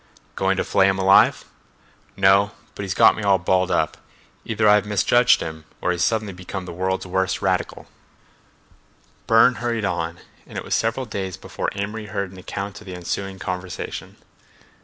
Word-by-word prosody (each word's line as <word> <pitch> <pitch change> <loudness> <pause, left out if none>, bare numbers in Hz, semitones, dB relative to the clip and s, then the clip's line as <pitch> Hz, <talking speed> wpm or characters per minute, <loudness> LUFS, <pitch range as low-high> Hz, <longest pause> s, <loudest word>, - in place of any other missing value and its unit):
"Going 95 0 +1
to - - +1
flay 95 0 +3
him 95 0 +1
alive?" 95 0 +4 0.7
"No—but 100 +2 +2
he's 95 -1 -3
got - - +6
me - - -5
all 100 -2 +4
balled 95 +1 +1
up. - - 0 0.5
Either 110 -1 0
I've 105 0 +5
misjudged 120 +4 +4
him 80 -1 -6 0.2
or 90 - 0
he's 90 0 0
suddenly 110 -2 0
become 90 +1 -7
the 90 - -7
world's 95 +2 -2
worst 95 +1 -1
radical." 95 -1 -1 1.4
Burne 115 +3 +6
hurried 115 -3 -1
on, 85 -3 -2 0.3
and - - -9
it - - -4
was - - -4
several 115 +4 0
days 95 -5 -5
before - - -4
Amory 105 +2 -4
heard 100 -2 -3
an 95 - -12
account 100 +2 -6
of 105 - -14
the 90 - -6
ensuing 95 +2 -4
conversation. 90 -1 -6
95 Hz, 165 wpm, -22 LUFS, 95-105 Hz, 1.4 s, got